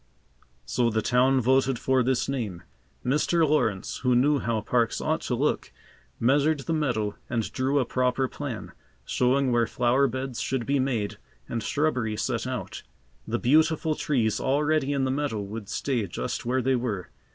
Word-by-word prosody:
So 120 -2 +1
the 110 -1 0
town 130 +2 +3
voted 130 +1 +2
for 130 +2 +2
this 125 0 +1
name. 110 -11 -3 0.4
Mr. 155 +5 +2
Lawrence, 120 -10 0
who 125 -2 +1
knew 140 +4 +3
how 115 -3 -1
parks 115 +1 +1
ought - - 0
to - - +1
look, - - -1 0.5
measured 145 +4 +3
the 165 - -2
meadow 120 -10 -1
and 115 -3 -1
drew 135 +2 0
a 135 - +2
proper 125 +2 +1
plan, 130 -5 -6 0.3
showing 130 +1 +2
where 120 -1 +2
flower 125 +3 +2
beds 130 0 -4
should 130 -3 -1
be 140 0 +1
made 120 -6 -1 0.3
and 115 - -3
shrubbery 125 -6 0
set - - -1
out. - - -5 0.5
The - - 0
beautiful 155 +4 +3
trees 120 -8 0
already 145 +1 +1
in 140 -2 0
the 130 - +1
meadow 140 -5 -1
would 105 +1 -7
stay 120 -7 -1
just 95 - -4
where 130 +1 +1
they 130 +1 +2
were. 110 -8 -3
130 Hz, 165 wpm, -26 LUFS, 115-140 Hz, 0.5 s, town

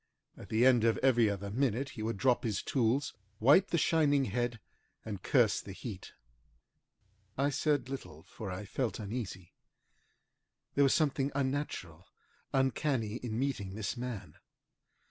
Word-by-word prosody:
At - - -12
the 110 +3 +3
end 125 -3 +5
of 115 -1 +3
every 120 -4 +5
other 100 0 -4
minute 130 +2 0
he 125 -4 -8
would 110 0 -2
drop 125 +2 +2
his 105 -4 -1
tools, 130 +2 +1 0.3
wipe 145 - +6
the 170 - 0
shining 145 -3 +3
head, 120 -2 -2 0.5
and 100 -4 -5
curse 120 - +3
the 95 - -9
heat. 100 -2 -8 1.2
I 140 +2 +2
said 145 -1 +1
little, 90 - -7
for 100 +2 -8
I 95 +3 -5
felt 120 +4 -2
uneasy. 100 -5 -6 1.2
There 140 - +4
was 135 - +4
something 140 -3 +1
unnatural, 130 - -3 0.4
uncanny, 130 -4 0
in 115 -3 -4
meeting 115 -8 -2
this 110 +1 -3
man. 115 -10 -6
120 Hz, 145 wpm, -32 LUFS, 105-135 Hz, 1.2 s, wipe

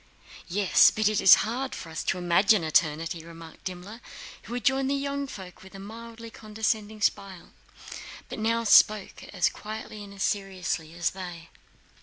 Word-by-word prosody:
"Yes, 195 +1 +5
but 215 -1 0
it 215 -1 +1
is 190 - +9
hard 255 +4 -3
for 165 - -9
us 160 - -4
to 190 - 0
imagine 180 +3 +3
eternity," 160 +1 0
remarked 165 -1 -13
Dimmler, 185 +5 -7 0.4
who 240 - -6
had 245 - -4
joined 270 -1 +2
the 280 - +1
young 280 0 -3
folk 190 -7 -10
with 190 +1 -14
a - - -9
mildly 230 +2 -10
condescending 215 0 -3
smile 195 -3 -2 0.8
but - - -7
now 230 +1 0
spoke 215 -2 +4
as - - 0
quietly 215 0 -7
and 200 -1 -12
seriously 185 -5 -2
as 175 0 0
they. 175 -3 -9
200 Hz, 160 wpm, -27 LUFS, 175-225 Hz, 0.8 s, is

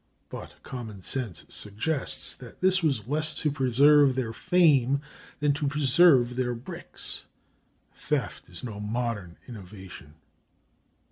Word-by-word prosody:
But - - -8
common 110 -7 -8
sense 115 - -2
suggests 135 +6 -2
that 125 -2 -13
this 185 0 +3
was 135 - 0
less 155 +4 +1
to 150 - 0
preserve 140 +1 +5
their 120 -4 -2
fame 140 -6 +3 0.4
than 145 0 +2
to 145 0 -2
preserve 140 -3 +4
their 125 -1 0
bricks. 120 +2 -8 0.7
Theft - - -3
is - - -11
no 110 -5 -6
modern 105 -4 -3
innovation. 95 -8 -11
130 Hz, 120 wpm, -27 LUFS, 110-145 Hz, 0.7 s, preserve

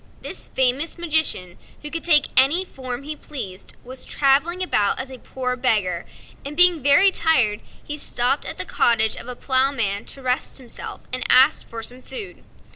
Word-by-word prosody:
This - - -5
famous 265 +6 0
magician, 315 - 0 0.2
who 295 - -6
could 330 - -4
take 300 -4 +6
any 290 +9 +4
form 255 -4 -7
he 305 +2 -6
pleased, 205 -12 -7
was 255 +1 -7
travelling 295 +7 +1
about 210 - 0
as 265 0 -5
a 260 - -10
poor 250 0 -4
beggar, 210 -9 -1 0.4
and 290 +2 -8
being 355 -3 +6
very 285 +9 +5
tired 250 - +2 0.2
he 295 0 -6
stopped 250 +1 0
at - - -5
the - - -2
cottage 220 -2 +2
of 235 - -10
a 250 - -6
Ploughman 260 -6 0
to 270 - -8
rest 250 0 -1
himself, 255 -4 -7
and 255 - 0
asked 260 +4 +5
for 225 -1 -7
some 250 +2 -4
food. 415 - -9
265 Hz, 175 wpm, -21 LUFS, 245-300 Hz, 0.4 s, take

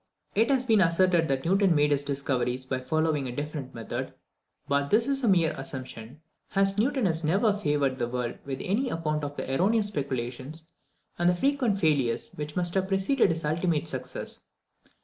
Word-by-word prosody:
It 225 +5 +2
has 265 -2 +2
been 220 -5 +4
asserted 170 -1 +3
that 135 0 -1
Newton 190 0 +3
made 150 0 +3
his 140 -1 +2
discoveries 130 -3 -2
by 130 0 -2
following 150 +1 0
a - - -4
different 145 0 -5
method; 115 -1 -5 0.5
but 140 0 +1
this 230 +2 +3
is 275 -1 0
a - - +2
mere 175 -5 +4
assumption, 130 0 -7 0.3
as 195 +1 +3
Newton 255 +1 +1
has 165 -2 0
never 200 +7 +3
favoured 145 -8 0
the 120 - 0
world 120 -1 -3
with 135 -1 -5
any 240 +8 0
account 155 -4 -2
of 145 0 -5
the - - -3
erroneous 205 +7 +2
speculations 135 - -4 0.6
and 175 0 +4
the 180 - +2
frequent 255 -1 +1
failures 145 - +1
which 150 0 -6
must 175 -1 0
have 190 -1 +1
preceded 195 +7 +2
his 165 -1 -2
ultimate 160 0 0
success. 130 -4 -5
160 Hz, 180 wpm, -27 LUFS, 135-195 Hz, 0.6 s, been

